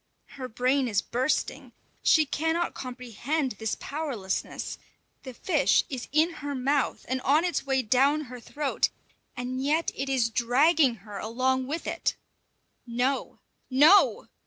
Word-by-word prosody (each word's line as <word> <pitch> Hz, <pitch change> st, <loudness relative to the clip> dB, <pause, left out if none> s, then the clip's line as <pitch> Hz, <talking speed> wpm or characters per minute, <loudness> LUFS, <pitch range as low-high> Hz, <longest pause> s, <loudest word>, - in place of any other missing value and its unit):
Her 260 Hz, -2 st, -7 dB
brain 255 Hz, +3 st, +1 dB
is 205 Hz, -5 st, 0 dB
bursting; 255 Hz, +5 st, -2 dB, 0.3 s
she 315 Hz, -1 st, +4 dB
cannot 325 Hz, +4 st, -1 dB
comprehend 255 Hz, +3 st, -3 dB
this 220 Hz, -1 st, -2 dB
powerlessness: 275 Hz, -11 st, -4 dB, 0.4 s
the 260 Hz, -, -8 dB
fish 315 Hz, 0 st, +2 dB
is 255 Hz, -3 st, -5 dB
in 310 Hz, +4 st, +3 dB
her 285 Hz, 0 st, -3 dB
mouth 270 Hz, +1 st, 0 dB
and 260 Hz, +1 st, -2 dB
on 300 Hz, +7 st, +3 dB
its 350 Hz, -5 st, -2 dB
way 265 Hz, -1 st, +1 dB
down 270 Hz, +6 st, +3 dB
her 250 Hz, -3 st, -9 dB
throat, 285 Hz, +4 st, -1 dB, 0.5 s
and 250 Hz, +1 st, -3 dB
yet 310 Hz, +4 st, +1 dB
it 270 Hz, +1 st, -4 dB
is 245 Hz, -4 st, +1 dB
dragging 260 Hz, +4 st, +3 dB
her 205 Hz, -2 st, -7 dB
along 255 Hz, +3 st, 0 dB
with 315 Hz, +4 st, -4 dB
it. -, -, -1 dB, 0.7 s
No! 250 Hz, +3 st, -1 dB, 0.3 s
_No! 285 Hz, -, +5 dB
265 Hz, 135 wpm, -27 LUFS, 245-295 Hz, 0.7 s, No